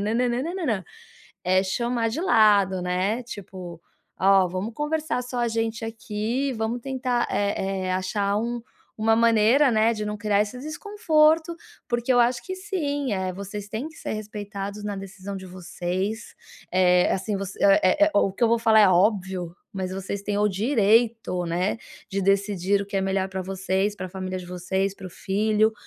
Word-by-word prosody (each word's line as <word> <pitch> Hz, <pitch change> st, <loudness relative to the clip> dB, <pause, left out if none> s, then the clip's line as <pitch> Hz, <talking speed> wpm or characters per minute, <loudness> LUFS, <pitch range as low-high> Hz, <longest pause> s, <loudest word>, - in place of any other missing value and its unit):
nã, 245 Hz, +1 st, +2 dB
nã, 240 Hz, +1 st, -1 dB
nã, 345 Hz, +2 st, -3 dB
nã. 210 Hz, -7 st, -1 dB, 0.6 s
É 185 Hz, +1 st, +4 dB
chamar 235 Hz, +3 st, 0 dB
de 270 Hz, -, -3 dB
lado, 205 Hz, -, +4 dB
né, 185 Hz, +6 st, 0 dB
tipo: 185 Hz, -6 st, -9 dB, 0.4 s
"Ó 195 Hz, 0 st, +5 dB
vamos 185 Hz, +5 st, -4 dB
conversar, 300 Hz, -1 st, -1 dB
só 245 Hz, 0 st, -5 dB
a 240 Hz, -, +1 dB
gente 225 Hz, 0 st, -2 dB
aqui, 225 Hz, +4 st, -2 dB
vamos 225 Hz, +2 st, -2 dB
tentar, 255 Hz, -2 st, -1 dB
eh 195 Hz, -2 st, -1 dB
eh, -, -, 0 dB
achar 200 Hz, +2 st, 0 dB
um 235 Hz, +1 st, -3 dB, 0.4 s
uma 225 Hz, +1 st, +3 dB
maneira, 230 Hz, +4 st, +4 dB
né, 220 Hz, +1 st, +3 dB
de 215 Hz, -1 st, -4 dB
não 210 Hz, -, -3 dB
criar 210 Hz, -1 st, +1 dB
esse 210 Hz, +4 st, -6 dB
desconforto. 320 Hz, 0 st, +2 dB, 0.3 s
Porque 240 Hz, +1 st, +1 dB
eu 245 Hz, -, +5 dB
acho 240 Hz, 0 st, +2 dB
que 375 Hz, -, -3 dB
sim, 290 Hz, -, -2 dB
eh, 190 Hz, -1 st, -1 dB
vocês 200 Hz, +2 st, -7 dB
têm 225 Hz, +8 st, -4 dB
que 310 Hz, -, -17 dB
ser -, -, -5 dB
respeitados 205 Hz, -1 st, -6 dB
na 205 Hz, -1 st, -3 dB
decisão 195 Hz, 0 st, -7 dB
de 190 Hz, 0 st, -8 dB
vocês, 185 Hz, +3 st, -4 dB, 0.4 s
eh, 180 Hz, -1 st, +4 dB
assim, 200 Hz, +2 st, -1 dB
você, 195 Hz, 0 st, -6 dB
eh, 200 Hz, +8 st, +5 dB
eh, -, -, +1 dB
o 195 Hz, -1 st, +3 dB
que 215 Hz, -, +1 dB
eu -, -, +4 dB
vou 235 Hz, -, +4 dB
falar 220 Hz, -1 st, +5 dB
é 205 Hz, -, +6 dB
óbvio, 185 Hz, -2 st, +1 dB, 0.2 s
mas 190 Hz, -2 st, -3 dB
vocês 195 Hz, +1 st, -4 dB
têm 205 Hz, 0 st, -2 dB
o 210 Hz, -, +3 dB
direito, 220 Hz, -2 st, +2 dB
né, 180 Hz, +6 st, -1 dB, 0.3 s
de 195 Hz, 0 st, -1 dB
decidir 195 Hz, 0 st, +1 dB
o -, -, -9 dB
que 200 Hz, 0 st, -4 dB
é -, -, +2 dB
melhor 190 Hz, 0 st, 0 dB
pra 190 Hz, 0 st, -4 dB
vocês, 190 Hz, +2 st, -1 dB
para 185 Hz, -1 st, -5 dB
família 185 Hz, 0 st, -5 dB
de 180 Hz, -, -9 dB
vocês, 190 Hz, +2 st, -2 dB
para 195 Hz, -, -9 dB
o -, -, -17 dB
filho. 215 Hz, +4 st, +1 dB
210 Hz, 185 wpm, -25 LUFS, 190-235 Hz, 0.6 s, é